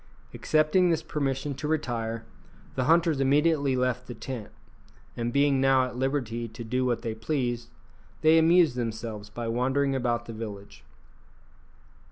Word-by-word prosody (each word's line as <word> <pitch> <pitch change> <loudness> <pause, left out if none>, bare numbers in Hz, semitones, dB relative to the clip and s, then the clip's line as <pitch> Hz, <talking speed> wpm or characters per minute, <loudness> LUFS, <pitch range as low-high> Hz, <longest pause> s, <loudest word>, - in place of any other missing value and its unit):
Accepting 155 +4 +2
this 160 -1 +1
permission 140 -2 -2
to 150 +3 -5
retire, 115 -7 -2 0.5
the 130 - -1
hunters 165 -1 +3
immediately 145 0 +3
left 125 -1 -1
the 120 - -7
tent; 120 -2 -6 0.7
and 120 0 -2
being 140 0 +3
now 135 -1 +4
at 125 - -7
liberty 125 -3 -2
to 115 +2 -9
do 125 +3 -1
what 120 -2 -1
they 115 - -2
pleased, 120 +1 -2 0.5
they 160 +1 +6
amused 165 -4 +4
themselves 110 -3 -4
by 115 +2 -5
wandering 130 +4 +1
about 120 -3 -1
the 115 - -7
village. 100 - -8
130 Hz, 145 wpm, -27 LUFS, 115-145 Hz, 0.7 s, they